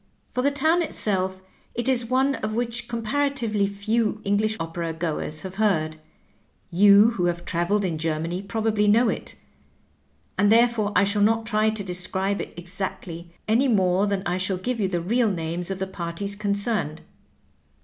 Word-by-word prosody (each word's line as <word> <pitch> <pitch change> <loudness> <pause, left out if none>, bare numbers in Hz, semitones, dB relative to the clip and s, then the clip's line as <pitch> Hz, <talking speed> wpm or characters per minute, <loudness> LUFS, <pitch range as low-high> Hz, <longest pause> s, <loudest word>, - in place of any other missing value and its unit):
For 250 - 0
the 280 - +3
town 315 +5 +2
itself, 190 - -1 0.3
it 240 +1 -2
is 245 -3 +1
one 265 +2 +2
of 215 -4 -3
which 235 0 -2
comparatively 235 -3 0
few 215 +2 -1
English 215 +2 +1
opera 165 0 -3
goers 155 -1 -3
have 190 0 -7
heard; 155 -7 +1 0.7
you 200 +4 +6
who 185 -7 -1
have 175 0 -1
traveled 190 +4 0
in 165 -4 -2
G 165 +1 0
er 155 -1 -1
many 170 +3 -3
probably 210 +1 0
knpw 225 +3 +4
it, - - -9 1.0
and 205 +1 +4
therefore 230 -2 +3
I 200 - +5
shall 200 +1 +1
not 225 +2 +3
try 215 0 +2
to 215 -2 -3
describe 190 +2 -1
it - - -7
exactly, 175 -1 -6 0.2
any 235 +6 +3
more 190 -3 +2
than 200 -1 -1
I 175 +1 0
shall 185 0 0
give 240 +6 -3
you 200 - +1
the 175 -2 -2
real 225 +6 +2
names 170 -1 -3
of 195 - -2
the 190 - -2
parties 190 +2 -5
concerned. 200 -5 -1
200 Hz, 170 wpm, -24 LUFS, 180-225 Hz, 1.0 s, you